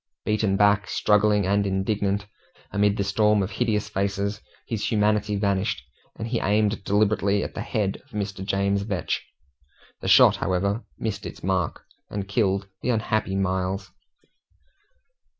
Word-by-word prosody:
Beaten 105 Hz, -2 st, +1 dB
back, 105 Hz, 0 st, +4 dB
struggling, 105 Hz, -1 st, +3 dB
and 100 Hz, +1 st, +2 dB
indignant, 100 Hz, +1 st, 0 dB, 0.5 s
amid 105 Hz, 0 st, +2 dB
the 100 Hz, -, +1 dB
storm 105 Hz, +1 st, +3 dB
of 95 Hz, -, -4 dB
hideous 110 Hz, -4 st, 0 dB
faces, 100 Hz, +2 st, -2 dB, 0.2 s
his 110 Hz, -3 st, -2 dB
humanity 105 Hz, -1 st, +2 dB
vanished, 100 Hz, -1 st, 0 dB, 0.3 s
and 110 Hz, -, -4 dB
he 115 Hz, -1 st, 0 dB
aimed 105 Hz, 0 st, +1 dB
deliberately 100 Hz, 0 st, +2 dB
at -, -, -5 dB
the -, -, -4 dB
head 100 Hz, -3 st, -2 dB
of -, -, -29 dB
Mr. 100 Hz, -2 st, -4 dB
James 100 Hz, 0 st, +1 dB
Vetch; 100 Hz, -3 st, -2 dB, 0.8 s
the -, -, -5 dB
shot, -, -, +7 dB
however, 100 Hz, +5 st, 0 dB
missed 105 Hz, -2 st, -3 dB
its -, -, -10 dB
mark, 95 Hz, -3 st, -1 dB, 0.2 s
and 100 Hz, -1 st, -4 dB
killed 100 Hz, -2 st, +1 dB
the -, -, -2 dB
unhappy 110 Hz, -4 st, 0 dB
Miles. 95 Hz, 0 st, -1 dB
100 Hz, 140 wpm, -25 LUFS, 100-105 Hz, 0.8 s, shot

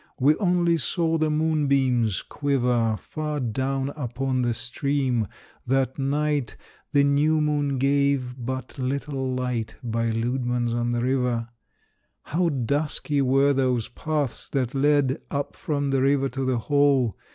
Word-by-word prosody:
We 145 Hz, +4 st, +5 dB
only 175 Hz, -3 st, +2 dB
saw 165 Hz, +4 st, 0 dB
the 155 Hz, 0 st, +2 dB
moonbeams 140 Hz, -, +1 dB
quiver 125 Hz, -6 st, 0 dB
Far 150 Hz, +3 st, -4 dB
down 135 Hz, +3 st, -1 dB
upon 130 Hz, -2 st, -2 dB
the 120 Hz, -1 st, +1 dB
stream! 125 Hz, -1 st, -1 dB, 0.4 s
that 135 Hz, +1 st, +1 dB
night 145 Hz, -2 st, 0 dB, 0.4 s
The 140 Hz, -, +4 dB
new 145 Hz, +3 st, +3 dB
moon 145 Hz, -2 st, 0 dB
gave 140 Hz, -1 st, +1 dB
but 130 Hz, +2 st, -5 dB
little 135 Hz, 0 st, -2 dB
light 125 Hz, -3 st, -2 dB
By 115 Hz, -1 st, -1 dB
Leudemann's 120 Hz, +1 st, -1 dB
on 120 Hz, 0 st, 0 dB
the 120 Hz, 0 st, 0 dB
River. 125 Hz, -3 st, 0 dB, 0.7 s
How 170 Hz, +3 st, 0 dB
dusky 145 Hz, +2 st, 0 dB
were 135 Hz, +2 st, +3 dB
those 130 Hz, -4 st, 0 dB
paths 150 Hz, 0 st, -2 dB
that 130 Hz, -3 st, -1 dB
led 145 Hz, 0 st, +2 dB
Up 140 Hz, -1 st, -3 dB
from 145 Hz, -4 st, -2 dB
the 135 Hz, -1 st, +2 dB
river 135 Hz, 0 st, +2 dB
to 135 Hz, +1 st, -3 dB
the 130 Hz, -1 st, +1 dB
hall. 140 Hz, -2 st, +2 dB
135 Hz, 135 wpm, -25 LUFS, 125-145 Hz, 0.7 s, We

